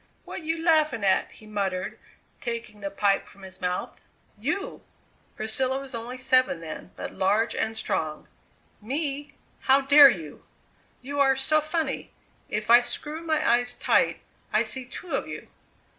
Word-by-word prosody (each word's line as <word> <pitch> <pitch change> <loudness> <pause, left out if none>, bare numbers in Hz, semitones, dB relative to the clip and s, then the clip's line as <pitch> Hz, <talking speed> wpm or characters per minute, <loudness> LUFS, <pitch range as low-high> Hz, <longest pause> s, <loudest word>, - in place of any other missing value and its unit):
"What - - -6
you 325 +1 -2
laughing 310 -8 +2
at?" 190 -1 +2
he 215 - -16
muttered, 195 -3 -3 0.4
taking 230 -3 -5
the 200 - -3
pipe 200 0 +1
from 195 - -15
his 190 0 -11
mouth. 180 0 -3 0.4
"You!" 300 - -3 0.5
Priscilla 255 +5 0
was 275 -1 -9
only 235 +2 -5
seven 255 -6 +3
then, 165 +2 -8
but - - -6
large 210 +5 +1
and 220 0 -1
strong. 155 -7 -2 0.5
"Me? 280 +4 -2 0.3
How 270 +1 +6
dare 280 +1 +9
you!" 160 - -5 0.6
"You 285 +3 -5
are 270 -1 +5
so 305 +4 +3
funny. 315 +1 -2 0.4
If 215 +2 -1
I 240 +1 +9
screw 295 +6 -5
my 315 -2 0
eyes 245 +1 +3
tight - - +2 0.3
I - - +3
see 260 -1 -3
two 330 +8 -9
of - - -1
you." - - -8
245 Hz, 155 wpm, -26 LUFS, 210-285 Hz, 0.6 s, dare